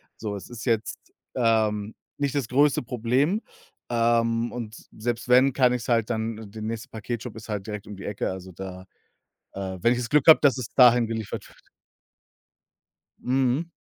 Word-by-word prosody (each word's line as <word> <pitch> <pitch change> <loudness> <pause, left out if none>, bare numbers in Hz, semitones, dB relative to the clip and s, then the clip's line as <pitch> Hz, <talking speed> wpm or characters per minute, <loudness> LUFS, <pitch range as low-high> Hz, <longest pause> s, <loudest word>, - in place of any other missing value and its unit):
So, 105 -2 -5
es 100 - -11
ist 120 -2 -8
jetzt, 115 -3 0 0.4
ähm, 110 -3 +1 0.2
nicht 140 -2 -1
das 135 -5 0
größte 140 +3 +3
Problem, 125 - 0 0.5
ähm, 115 0 +1
und 115 -3 -6 0.2
selbst 120 +2 -3
wenn, 130 +2 +5
kann 125 -2 +3
ich 125 - -2
es - - -8
halt 115 -2 +2
dann 110 -2 -3
der 110 - -8
nächste 110 +1 -4
Paketshop 115 +1 -6
ist 110 0 -10
halt 105 -1 -4
direkt 105 -1 -6
um 105 - -8
die 100 - -9
Ecke, 105 -2 -2
also 95 0 -8
da 95 0 -8 0.7
äh, 95 -1 -5
wenn 120 - +4
ich 125 - -2
das 115 - -4
Glück 150 0 +3
habe, 160 - +10
dass 140 -3 +4
es 120 -3 -4
dahin 120 -2 +6
geliefert 110 -2 -5
wird. - - -22 1.5
Mhm. 130 +5 0
115 Hz, 180 wpm, -25 LUFS, 110-125 Hz, 1.5 s, habe